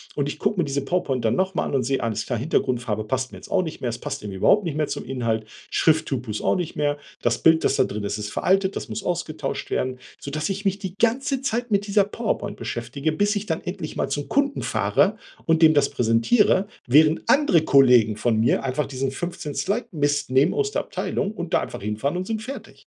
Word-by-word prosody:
Und 145 -1 0
ich 150 - -7
gucke 205 -1 0
mir - - +3
diese 140 0 -2
PowerPoint 135 -6 -1
dann 110 - +2
nochmal 190 -1 0
an - - -2
und 130 - +2
sehe, 135 +2 0
alles 115 -2 -2
klar, 120 -3 -2
Hintergrundfarbe 125 -5 -1
passt 130 +3 -2
mir - - -10
jetzt - - -13
auch 190 - +3
nicht 160 -4 -6
mehr. 125 - -1
Es 115 - -6
passt - - -5
überhaupt 105 - +2
nicht 155 -3 -3
mehr 150 - +1
zum - - -5
Inhalt. 115 -4 -2 0.2
Schrifttypus 135 -9 +1
auch - - +2
nicht 175 -3 -3
mehr. 145 0 0 0.2
Das - - 0
Bild, 160 0 +5
das - - +2
da - - +4
drin 105 -3 -4
ist, 100 +1 -2
ist 105 0 -5
veraltet. 190 +1 +1
Das - - -5
muss 200 - -4
ausgetauscht 160 -5 -3
werden 130 0 -1 0.2
sodass 150 +5 -3
ich 200 +1 -4
mich 195 +1 +1
die 190 -1 -6
ganze 265 +4 +1
Zeit 240 -2 -1
mit 200 0 +2
dieser 200 0 +4
PowerPoint 205 0 -3
beschäftige, 130 +6 -3
bis 205 +6 +1
ich 205 +1 -2
dann 160 -4 -2
endlich 180 -4 -6
mal - - -1
zum 145 +1 -3
Kunden 280 0 0
fahre - - +1 0.3
und 165 0 +2
dem 155 -1 +7
das 145 - +3
präsentiere, 125 - +3 0.2
während 155 +5 +5
andere 265 - +5
Kollegen 125 -8 +5
von 110 0 +1
mir 115 - +2
einfach 135 +2 -1
diesen 135 -1 -2
15 170 0 -5
Slide 210 - -1
Mist 145 -3 0
nehmen 135 +6 +4
aus 420 0 0
der - - 0
Abteilung 205 - -3
und 170 -5 -6
da - - +4
einfach - - -6
hinfahren 110 +10 -2
und 185 - -3
sind 220 +1 -3
fertig. 270 +5 -9
150 Hz, 225 wpm, -23 LUFS, 130-195 Hz, 0.3 s, dem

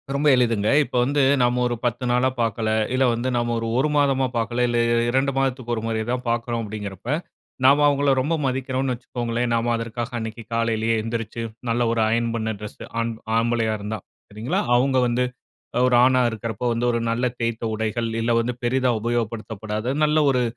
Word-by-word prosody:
ரொம்ப 150 +2 +1
எளிதுங்க. 115 -4 +1
இப்ப - - -8
வந்து 140 +2 +1 0.2
நம்ம 120 0 +2
ஒரு 120 - -1
10 120 +1 -1
நாளா 125 +1 +3
பார்க்கல, 110 -1 0 0.2
இல்ல 130 +1 +2
வந்து 120 +2 -1
நம்ம 120 0 0 0.3
1 150 +3 +2
மாதமா 135 -2 +2
பார்க்கல, 120 +2 0
இல்ல 120 0 0
இ 120 - +2 0.2
2 135 +2 +2
மாதத்துக்கு 130 -3 -1
1 110 - -3
முறை 110 -1 -1
தான் 125 0 -2
பார்க்கறோம் 115 0 -1
அப்படின்கிறப்ப 105 0 -7 0.6
நாம 140 +2 +6
அவுங்கள 145 -1 +3
ரொம்ப 150 +6 +1
மதிக்கிறோம்னு 130 0 -1
வச்சுக்கோங்களேன். 120 0 -3
நாம 115 +1 +1
அதற்காக 115 +1 -4
அன்னைக்கு 110 +1 -6
காலையிலயே 115 0 +1
எழுந்திருச்சு 115 0 -4 0.3
நல்ல 115 +1 +1
ஒரு 115 - 0
அயன் 115 0 +1
பண்ண 110 -1 -1
ட்ரெஸ்சு 105 -1 -8
ஆம் 115 0 0 0.3
ஆம்பளயா 115 -1 +1
இருந்தா 105 +2 -4 0.3
சரிங்களா. 110 +4 -2 0.2
அவுங்க 130 +2 +2
வந்து 120 +1 +1 0.6
அ - - +3
ஒரு 125 -1 +4
ஆணா 130 0 +4
இருக்குறப்ப 110 +1 -5
வந்து 115 +1 0
ஒரு 115 - 0
நல்ல 120 +2 0 0.2
தேய்த்த 115 0 -2
உடைகள், 110 +1 -2
இல்ல 115 +1 0
வந்து 120 +2 -1
பெரிதா 130 +1 +2
உபயோகப்படுத்தப்படாத 110 0 -3
நல்ல 150 +1 +2
ஒரு 125 -2 +2
120 Hz, 175 wpm, -23 LUFS, 115-125 Hz, 0.6 s, நாம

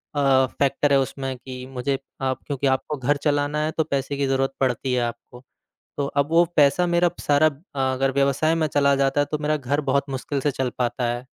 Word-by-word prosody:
अ, 135 -2 +4
factor 140 +1 +2
है 135 - +5
उसमें 135 0 -3
कि 130 0 -9
मुझे 135 +1 -2 0.2
आप 130 -1 -1
क्योंकि 140 -1 -1
आपको 135 +3 -1
घर 140 +3 +1
चलाना 145 0 +1
है 155 - -1
तो 160 - +3
पैसे 140 0 -2
की 140 -1 0
ज़रूरत 135 0 0
पड़ती 130 0 0
है 125 - +1
आपको। 120 +1 -7 0.5
तो 140 - -1
अब 140 +1 0
वो 170 +1 +5
पैसा 150 +5 +4
मेरा 175 0 +2
सारा 145 +2 +3
अ, - - -4 0.4
अगर 135 +1 +1
व्यवसाय 140 +3 +2
में 160 -1 +1
चला 140 -1 +2
जाता 135 +1 +2
है 145 - +3
तो 150 - -1
मेरा 150 +1 0
घर 145 +1 -1
बहुत 140 +1 +1
मुश्किल 135 +1 -3
से 145 - +1
चल 130 -2 -2
पाता 125 0 -1
है, 120 +2 -3
140 Hz, 215 wpm, -23 LUFS, 130-145 Hz, 0.5 s, है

